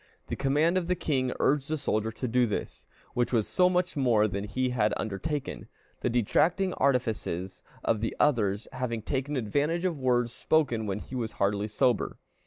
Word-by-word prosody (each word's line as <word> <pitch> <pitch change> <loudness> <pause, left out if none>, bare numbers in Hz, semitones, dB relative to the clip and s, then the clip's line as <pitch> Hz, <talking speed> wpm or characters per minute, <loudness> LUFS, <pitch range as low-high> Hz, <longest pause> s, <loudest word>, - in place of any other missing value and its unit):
The - - -1
command 150 +6 +2
of 170 - -5
the 180 - +2
king 130 -7 0
urged 140 0 +2
the 155 - 0
soldier 110 -6 -1
to 125 +3 -4
do 125 +1 +3
this, 105 - -5 0.3
which 120 0 0
was 115 -4 +2
so 180 -1 +3
much 180 0 0
more 120 -6 +3
than 100 0 -3
he 130 +4 -1
had 110 -4 +1
undertaken, 130 +8 -3 0.3
the - - 0
detracting 165 - +2
artifices 110 -9 -1 0.2
of 110 - +1
the 115 - -2
others 110 -8 +2
having 115 -4 -3
taken 140 +3 -2
advantage 145 - 0
of 170 -6 -1
words 120 -2 +1
spoken 125 -10 +1
when 95 -1 -1
he 105 - -10
was 115 -4 -3
hardly 100 +1 0
sober. 110 +1 +1
125 Hz, 180 wpm, -28 LUFS, 110-150 Hz, 0.3 s, do